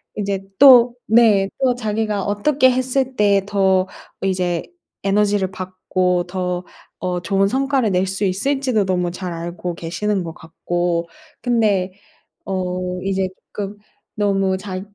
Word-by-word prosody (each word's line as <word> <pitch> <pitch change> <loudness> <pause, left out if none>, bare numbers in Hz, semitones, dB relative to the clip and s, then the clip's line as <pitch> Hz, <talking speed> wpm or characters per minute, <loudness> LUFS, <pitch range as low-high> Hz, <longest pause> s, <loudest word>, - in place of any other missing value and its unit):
이제 200 -2 -2 0.2
또 250 -3 +8
네 215 -4 +5
또 255 -2 +3
자기가 215 -3 -1
어떻게 260 +7 +3
했을 255 +1 0
때 200 -2 +3
더 190 -2 +2 0.4
이제 180 -3 0 0.4
에너지를 200 -1 +1
받고 185 -1 -1
더 180 -1 -3 0.4
어 180 -1 -2
좋은 195 +2 +2
성과를 265 -1 +1
낼 180 +1 +2
수 195 +2 -2
있을지도 245 +4 0
너무 180 -2 0
잘 180 0 -5
알고 170 +1 -5
계시는 180 +4 -2
것 165 - -6
같고 170 +1 -2 0.3
근데 210 -6 +1 0.5
어 180 -1 -3
이제 190 -1 0 0.2
쪼끔 205 0 -5 0.4
너무 195 -2 +1
자 190 -1 -5
195 Hz, 230 characters per minute, -20 LUFS, 180-215 Hz, 0.5 s, 또